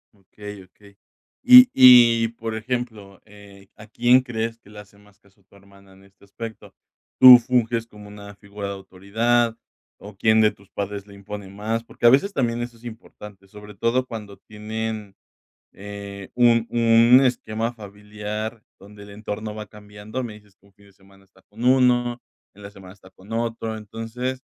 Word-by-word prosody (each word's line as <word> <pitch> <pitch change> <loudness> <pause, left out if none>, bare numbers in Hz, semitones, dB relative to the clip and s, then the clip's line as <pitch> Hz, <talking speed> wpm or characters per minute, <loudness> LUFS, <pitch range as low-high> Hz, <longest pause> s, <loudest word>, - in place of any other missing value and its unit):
Okey, 105 +1 -12
okey, 100 +2 -22 0.5
y 250 0 +9
y 120 -3 +7
por 115 -1 -7
ejemplo, 110 -4 -6
eh, 100 -1 -17
¿a 110 0 -15
quién 120 +3 +3
crees 115 -2 -5
que 100 - -22
le 105 - -15
hace 100 0 -16
más 105 -1 -24
caso 100 0 -30
tu 100 - -26
hermana 100 -1 -21
en 95 +1 -21
este 100 0 -25
aspecto? 110 +3 -11 0.4
¿Tú 125 -1 +10
funges 120 -1 -1
como 105 -2 -15
una 100 0 -12
figura 100 0 -9
de 100 - -5
autoridad, 110 +5 -1 0.4
o, 105 0 -13
quién 110 +2 +2
de 110 -1 +3
tus 100 -1 -23
padres 100 0 -6
le 100 - -15
impone 100 0 -9
más? 110 +3 -4
Porque 120 - -7
a - - +9
veces 195 +10 +2
también 120 -5 -2
eso 120 -1 -7
es 115 - -24
importante, 105 -4 -13
sobre 105 +1 -13
todo 120 +5 -1
cuando 105 -5 -9
tienen, 110 0 -7 0.6
eh, 100 -1 -10
un 120 -1 +3
un 115 +2 +5
esquema 115 -2 -2
familiar 105 +1 -8 0.2
donde 100 +1 -14
el 100 - -14
entorno 105 +1 -7
va 105 -1 -8
cambiando. 105 +4 -9
Me 115 - -8
dices 105 -2 -19
que - - -30
un 100 - -26
fin 100 0 -23
de - - -21
semana 95 0 -24
está 95 -1 -27
con 110 +3 -12
uno, 125 -1 +2 0.3
en 100 - -17
la 100 - -9
semana 95 -2 -14
está 95 -2 -20
con 100 +4 -18
otro. 115 -1 -4
Entonces, 115 +4 -6
105 Hz, 180 wpm, -22 LUFS, 100-115 Hz, 0.6 s, Tú